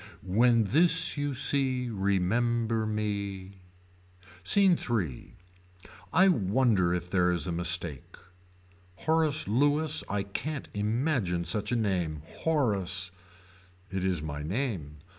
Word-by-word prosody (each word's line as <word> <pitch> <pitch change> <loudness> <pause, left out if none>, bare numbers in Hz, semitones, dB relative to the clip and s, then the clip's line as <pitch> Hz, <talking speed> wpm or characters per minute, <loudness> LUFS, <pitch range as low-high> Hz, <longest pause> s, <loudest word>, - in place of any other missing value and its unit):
When 115 +5 +3
this 165 - +3
you 145 -2 -2
see 130 -1 +2
remember 110 +3 0
me. 100 -3 -4 0.8
SCENE 195 -4 +4
III. 90 - -3 0.8
I 185 +3 +5
wonder 105 - +2
if 90 0 -2
there 90 -2 +3
is 85 - -1
a 90 - -3
mistake. 85 -4 -2 0.8
Horace 155 - +1
Lewis 145 +7 +2
I 100 -1 -1
can't 140 +9 -5
imagine 105 - -1
such 105 +5 0
a - - +1
name. 90 -9 -1 0.2
Horace. 100 - 0 0.8
It 95 -1 -3
is 90 -5 -1
my 75 -1 -5
name. 85 - -3
105 Hz, 110 wpm, -28 LUFS, 90-130 Hz, 0.8 s, I